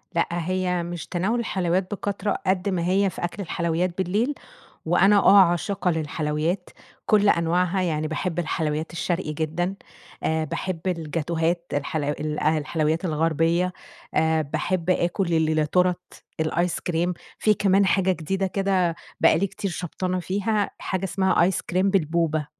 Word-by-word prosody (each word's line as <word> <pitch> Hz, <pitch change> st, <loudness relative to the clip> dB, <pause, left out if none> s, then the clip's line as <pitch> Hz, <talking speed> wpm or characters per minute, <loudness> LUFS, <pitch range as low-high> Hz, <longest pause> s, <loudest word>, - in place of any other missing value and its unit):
لأ 170 Hz, -, +2 dB
هي 180 Hz, +1 st, -1 dB
مش 170 Hz, -2 st, -6 dB
تناول 195 Hz, +7 st, 0 dB
الحلويّات 185 Hz, -3 st, -1 dB
بكترة 205 Hz, 0 st, -2 dB
قد 190 Hz, +1 st, +1 dB
ما 175 Hz, -2 st, -1 dB
هي 195 Hz, +1 st, +3 dB
في 175 Hz, -, -8 dB
أكل 175 Hz, +4 st, -3 dB
الحلويّات 170 Hz, +1 st, -1 dB
بالليل، 205 Hz, +9 st, 0 dB, 0.5 s
وأنا 190 Hz, +5 st, +5 dB
آه 200 Hz, 0 st, +7 dB
عاشقة 180 Hz, +2 st, +2 dB
للحلويات، 160 Hz, +3 st, -2 dB, 0.4 s
كُلّ 210 Hz, -1 st, +4 dB
أنواعها، 180 Hz, +2 st, +2 dB
يعني 155 Hz, -3 st, -1 dB
باحب 165 Hz, +2 st, -3 dB
الحلويّات 155 Hz, -1 st, -2 dB
الشرقي 170 Hz, -2 st, -2 dB
جدًا، 165 Hz, +5 st, -2 dB, 0.5 s
آآ 160 Hz, 0 st, 0 dB
باحب 165 Hz, +3 st, -4 dB
الجاتوهات، 165 Hz, 0 st, -1 dB
الحل 145 Hz, +1 st, -1 dB, 0.5 s
الحلويّات 155 Hz, +3 st, -1 dB
الغربيّة، 165 Hz, +2 st, +1 dB, 0.4 s
آآ 160 Hz, 0 st, +2 dB
باحب 175 Hz, +4 st, -2 dB
آكل 175 Hz, 0 st, +1 dB
ال 160 Hz, -, +3 dB
ل 155 Hz, -1 st, +2 dB
تُورَتْ، 180 Hz, +2 st, -1 dB, 0.2 s
الآيس 170 Hz, +2 st, 0 dB
كريم، 175 Hz, +1 st, -1 dB, 0.2 s
في 215 Hz, -1 st, +3 dB
كمان 195 Hz, 0 st, +3 dB
حاجة 190 Hz, 0 st, +3 dB
جديدة 190 Hz, +4 st, -2 dB
كده 190 Hz, -3 st, +1 dB, 0.3 s
بقى 160 Hz, -, +5 dB
لي 200 Hz, -, +1 dB
كتير 195 Hz, +1 st, -4 dB
شبطانة 180 Hz, +1 st, -3 dB
فيها 205 Hz, +3 st, -1 dB
حاجة 190 Hz, 0 st, -3 dB
اسمها 190 Hz, -1 st, +2 dB
آيس 180 Hz, 0 st, +1 dB
كريم 185 Hz, +2 st, +1 dB
بالبوبا 160 Hz, -4 st, +1 dB
175 Hz, 140 wpm, -24 LUFS, 160-190 Hz, 0.5 s, آه